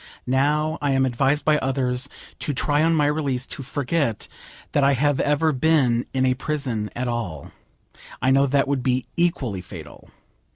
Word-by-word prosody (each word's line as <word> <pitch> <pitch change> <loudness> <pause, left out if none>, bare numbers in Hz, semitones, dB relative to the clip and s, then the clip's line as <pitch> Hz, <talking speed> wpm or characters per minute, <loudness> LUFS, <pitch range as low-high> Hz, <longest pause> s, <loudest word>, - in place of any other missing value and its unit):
Now 150 +4 +1
I 145 -2 +1
am 135 0 +3
advised 135 +4 +1
by 150 -1 +4
others 130 0 -1 0.3
to 145 - -3
try 145 +3 +1
on 165 +1 +3
my 150 -2 +3
release 145 -4 -1
to - - -7
forget 140 -3 -2 0.4
that 145 - +2
I 140 +1 +4
have 145 +1 +1
ever 150 +2 +2
been 130 -4 +2
in 130 -1 +1
a 130 - +3
prison 125 -6 -2
at 125 +1 -2
all. 100 -11 -4 0.7
I 130 - +2
know 135 +1 +4
that 140 +1 +2
would 140 -2 0
be 125 0 0
equally 135 - 0
fatal. 90 - -11
135 Hz, 170 wpm, -23 LUFS, 125-150 Hz, 0.7 s, by